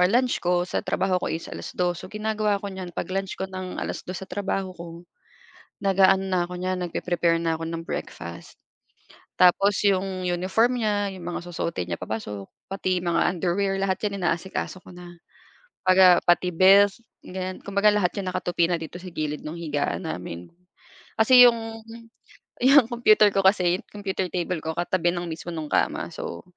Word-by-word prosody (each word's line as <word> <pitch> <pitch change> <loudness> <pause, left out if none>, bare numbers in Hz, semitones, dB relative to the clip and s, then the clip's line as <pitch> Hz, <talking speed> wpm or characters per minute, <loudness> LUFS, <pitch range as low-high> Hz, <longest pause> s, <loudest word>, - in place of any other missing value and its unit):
ah, 180 - +6
lunch 245 +4 +2
ko 175 0 +1
sa 180 - -2
trabaho 185 -1 +1
ko - - -3
is 165 - -4
2:00, 175 -1 -3
so - - -8
ginagawa 210 -1 -1
ko 200 - -4
niyan, 185 -2 -7
'pag 170 - -4
lunch 195 0 -2
ko, - - -3
ng 185 -1 -6
2:00 185 +1 -5
sa - - -24
trabaho 195 -1 -2
ko, 170 -1 -10 1.0
nag-aano 195 0 +4
na 185 -2 +1
ako 180 - -9
niyan, 185 +1 -1
nagpre-prepare 170 -1 0
na 165 -1 0
ako 165 - -7
ng 165 0 -5
breakfast. - - -7 0.8
Tapos 190 +2 +4
'yong 190 -2 +1
uniform 190 +8 +1
niya, 205 -2 0
'yong 180 -2 -10
mga 175 - -3
susuotin 170 - -3
niya 85 - -4
papasok, 105 -3 -5 0.2
pati 185 -1 0
mga 170 -1 +2
underwear 190 +3 0
lahat 195 -1 0
'yan 200 - -6
inaasikaso 185 +2 -2
ko - - -14
na. 175 0 -11 0.7
Baga 185 -1 +6
pati 180 +1 +2
belt 195 +3 +6 0.3
ganiyan, 185 0 -5
kumbaga 200 +1 +2
lahat 205 -4 +2
'yan 195 -2 -4
nakatupi 175 -2 0
na 175 - +2
dito 165 +2 -8
sa 185 - -9
gilid 155 -3 -4
nung 155 +2 -6
higaan 150 +1 -2
namin. 90 - -6 0.7
Kasi 245 +3 +8
'yong 225 -1 -1 0.8
'yong 270 -1 +7
computer 225 -3 +5
ko 195 - +2
kasi, 180 -2 +4
'yong - - -12
kompyuter 190 -3 -3
table 175 -2 -2
ko 160 - -2
katabi 175 0 +1
ng 175 0 -4
mismo 160 +1 -6
no'ng 160 -2 -4
kama, - - 0
so, - - -6
185 Hz, 175 wpm, -25 LUFS, 175-200 Hz, 1.0 s, Kasi